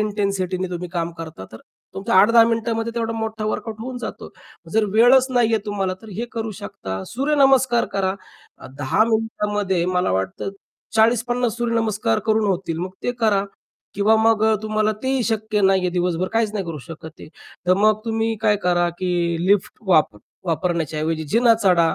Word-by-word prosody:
इंटेन्सिटीने 195 -3 -1
तुम्ही 180 0 -5
काम 170 -2 -2
करता. 160 -10 -8
तर 110 - -9 0.4
तुमच्या 195 0 -2
8-10 230 +4 +7
मिनिटामध्ये 230 0 -1
तेवढा 230 -1 -2
मोठा 220 -1 -4
वर्कआउट 215 0 -4
होऊन 255 +2 -5
जातो. - - -7 0.4
जर 220 0 +3
वेळच 245 +4 +6
नाहीये 230 -3 +2
तुम्हाला 195 -3 -2
तर 220 - -12
हे 235 - -1
करू 225 -2 -3
शकता. 95 - -6
सूर्यनमस्कार 270 -3 +3
करा 190 -1 0 0.6
10 145 +9 +2
मिनिटामध्ये 210 -5 -1
मला 180 - 0
वाटतं, 95 - -2 0.5
40-50 235 +1 +2
सूर्यनमस्कार 225 - 0
करून 220 -1 +2
होतील. 180 -4 -2
मग 180 +2 -3
ते 245 - -1
करा 205 -3 +2 0.5
किंवा 205 +3 +3
मग 220 -1 +3 0.2
तुम्हाला 215 0 0
तेही 265 -1 0
शक्य 220 -1 -1
नाही 190 -1 +4
आहे 180 - 0
दिवसभर 180 0 -1
काहीच 225 -2 +1
नाही 205 -3 -3
करू 165 -3 -6
शकत 160 +2 -9
आहे, - - -10 0.4
तर 185 - +5
मग 215 +1 +3
तुम्ही 225 0 -1
काय 210 -2 +3
करा 175 -1 +2
की 185 -1 -2 0.4
लिफ्ट 200 0 +2
वाप 155 - +3 0.3
वापरण्याच्या 165 -2 -1
ऐवजी 160 0 -2
जिना 235 0 +5
चढा, 170 -4 +3
210 Hz, 160 wpm, -21 LUFS, 180-225 Hz, 0.6 s, 8-10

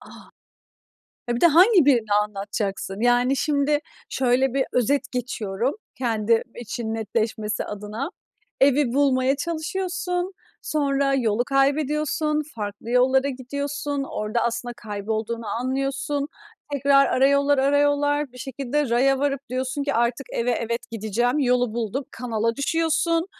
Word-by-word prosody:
A! - - -15 1.2
E, 240 - +1
bir - - -3
de - - +7
hangi 355 - +6
birini 230 -7 +3
anlatacaksın? 200 -1 -4
Yani 245 +3 +3
şimdi 290 0 +1 0.3
şöyle 260 0 +1
bir 270 -1 +2
özet 275 +3 +1
geçiyorum, 240 -1 -2 0.2
kendim 225 -2 +1
için 235 -1 -4
netleşmesi 220 0 -2
adına. 210 +6 -5 0.5
Evi 275 -2 +4
bulmaya 270 -1 +3
çalışıyorsun, 360 +3 -2 0.3
sonra 280 -2 +1
yolu 235 -3 +1
kaybediyorsun, 300 +2 +1
farklı 205 +2 -5
yollara 260 +2 +3
gidiyorsun, 280 +2 -3
orada 215 +3 -2
aslında 240 +1 -2
kaybolduğunu 220 +2 -4
anlıyorsun. 275 +5 -2 0.4
Tekrar 275 0 +4
ara 265 +1 +3
yollar, 280 0 +3
ara 280 +2 +3
yollar, 290 -1 +1
bir 250 - -13
şekilde 270 +2 -2
raya 265 +3 +3
varıp 275 -1 0
diyorsun 260 +3 -2
ki, 285 - -1
"Artık 240 +3 0
eve, 235 +1 0
evet, 235 0 -2
gideceğim, 230 +4 0
yolu 250 -4 +2
bulduk." 240 +4 -3
Kanala 230 -1 -2
düşüyorsun, 330 +3 +1
260 Hz, 125 wpm, -24 LUFS, 235-285 Hz, 1.2 s, de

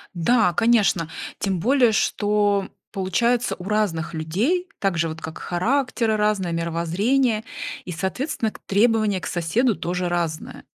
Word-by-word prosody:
Да, 180 +1 +3
конечно. 205 -7 +3 0.3
Тем 190 -3 -1
более 250 +2 +4
что, 205 -2 +1 0.2
получается, 235 +6 0
у - - -9
разных 195 -5 -1
людей 215 - 0
так 195 -4 0
же 165 0 +1
вот, 160 0 -7
как 160 0 -7
характеры 230 +3 0
разные, 205 -5 +1
мировоззрение, 195 +9 0 0.4
и, 180 - -5
соответственно, 215 - -2
к - - -14
требования 215 -1 +2
к - - -6
соседу 200 +8 +1
тоже 180 0 -2
разные. 170 -3 -3
200 Hz, 135 wpm, -23 LUFS, 170-230 Hz, 0.4 s, более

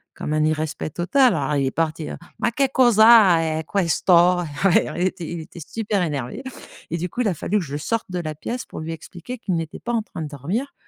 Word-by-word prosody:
comme 150 - -4
un 155 0 +2
irrespect 155 0 -2
total. 245 +5 +3
Alors 145 0 -1
il 135 - +1
est - - -1
parti: 160 -1 -2 0.3
«Ma - - +2
que 275 +4 +2
causa 215 -10 +5
e - - -10
questo!» 180 -1 +3 0.6
Il - - -2
était 180 -2 -1
il 170 -1 -4
était 175 +2 -12
super 210 +2 -2
énervé, 145 - -3 0.5
et 170 - -1
du 180 +2 -2
coup, 250 - -3
il 225 - +1
a - - 0
fallu 210 +7 0
que - - -3
je 145 +1 -4
sorte 230 +9 -2
de 180 - -4
la 155 -2 -4
pièce 240 +11 -5
pour - - -9
lui 165 +1 -4
expliquer 175 +9 -8
qu'il 190 -6 -3
n'était 165 -1 -4
pas 240 - -4
en 225 - +1
train 165 - -8
de - - -4
dormir, 170 - -4
175 Hz, 225 wpm, -22 LUFS, 155-220 Hz, 0.6 s, causa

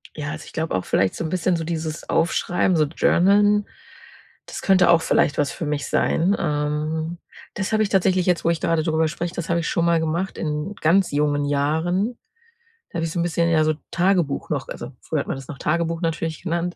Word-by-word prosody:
ja, 145 -1 -4
also, 155 0 -7
ich - - -13
glaube 160 -6 -2
auch, 95 - -2
vielleicht 95 - +1
so - - -4
'n 160 - -3
bisschen 180 +1 +1
so 165 - -2
dieses 160 -1 -4
Aufschreiben, 175 +2 +1
so 155 -2 +3
journalen, 205 +6 +3 0.8
das - - -6
könnte 190 -2 +4
auch 170 -1 +6
vielleicht 145 - +2
was 145 -2 +1
für 165 - -5
mich 145 -1 -2
sein. 180 +5 +2
Ähm, 155 +1 -2 0.3
das 195 +1 -3
habe 215 0 +3
ich 200 - -2
tatsächlich 185 -2 +2
jetzt, 180 -2 +1
wo 170 - +4
ich 170 -2 +1
gerade 165 -1 +1
drüber 160 0 +1
spreche 170 +2 -4
das 170 -1 -5
habe 170 0 +2
ich - - -2
schon 170 - +1
mal 170 -1 +3
gemacht 165 +4 -2
in 150 +4 -3
ganz 180 +4 +3
jungen 145 0 +1
Jahren. 160 - 0 0.7
Da - - -8
habe 165 - 0
ich 165 - -3
so 175 - -1
'n - - +2
bisschen 170 0 +1
ja, 160 -2 +4
so 155 0 +2 0.2
Tagebuch 175 -5 +1
noch 145 -4 -2
also, 120 +3 -7
früher 155 - -2
hat - - -4
man - - -2
das 135 -1 -9
noch 135 - -8
Tagebuch 165 +1 -1
natürlich 165 -2 -2
genannt 170 +1 -2
165 Hz, 220 wpm, -22 LUFS, 155-175 Hz, 0.8 s, auch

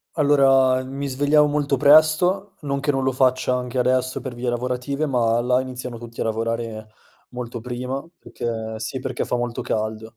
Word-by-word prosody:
Allora, 135 -3 +4
mi 135 +2 -5
svegliavo 145 +3 +3
molto 145 -1 0
presto 155 +8 +4
non 140 -1 -2
che 145 +1 0
non 135 -1 0
lo 130 - +1
faccia 130 0 +2
anche 125 0 -3
adesso 130 +1 +1
per 130 -3 -6
vie 120 +1 -4
lavorative, 125 +4 -2
ma 120 -3 +1
là 125 +1 +2
iniziano 125 -2 -6
tutti 115 0 -9
a - - 0
lavorare 115 -1 -3 0.4
molto 120 -1 -6
prima 125 +3 -4
perché 110 -2 -5
sì, 130 +4 -4
perché 130 -1 -3
fa 125 - -1
molto 120 -1 -3
caldo, 110 +1 -3
125 Hz, 170 wpm, -22 LUFS, 120-140 Hz, 0.4 s, Allora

